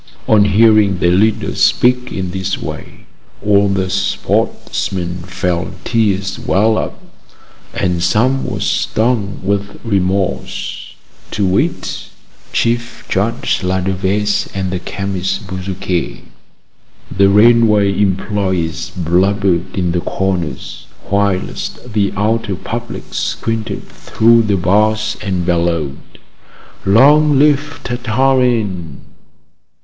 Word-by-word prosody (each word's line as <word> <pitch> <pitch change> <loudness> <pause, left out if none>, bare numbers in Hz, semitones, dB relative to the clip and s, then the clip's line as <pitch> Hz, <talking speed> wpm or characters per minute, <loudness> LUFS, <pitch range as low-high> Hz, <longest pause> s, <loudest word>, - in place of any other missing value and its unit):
On 105 -2 +5
hearing 105 -1 +4
their 85 0 +2
leader 105 +4 +1
speak 125 0 +2
in 95 -2 -4
this 95 +1 -2
way, - - -8 0.4
all 100 -1 +4
the 95 -1 0
sportsmen 95 -1 -1
felt 90 0 -3
tears 100 -4 0
well 110 +3 +2
up, - - -5 0.8
and 90 -3 0
some 115 +10 +2
were - - -4
stung 110 -3 0
with 100 +1 -2
remorse, 95 -3 -2 0.3
to 105 - -1
wit, 95 +1 -1 0.4
Chief 120 0 -1
Judge 105 +5 0
Ladevese 95 +2 0
and 95 -2 -2
the 90 - -2
chemist 95 +1 -3
Bezuquet. 95 -2 -3 0.9
The 100 0 +5
railway 105 -1 +4
employees 95 -4 -1
blubbered 90 +1 0
in 90 -2 0
the 90 0 0
corners, 90 -9 -3 0.2
whilst 100 +4 -2
the 100 -2 +1
outer 105 -1 0
public - - -6
squinted 115 -1 -3
through 115 +1 +2
the 105 -3 +1
bars 105 +4 +1
and 95 -4 -2
bellowed: 85 -5 0 0.9
"Long 145 +8 +5
live 145 0 +2
Tartarin!" 120 - 0
100 Hz, 100 wpm, -16 LUFS, 95-110 Hz, 0.9 s, On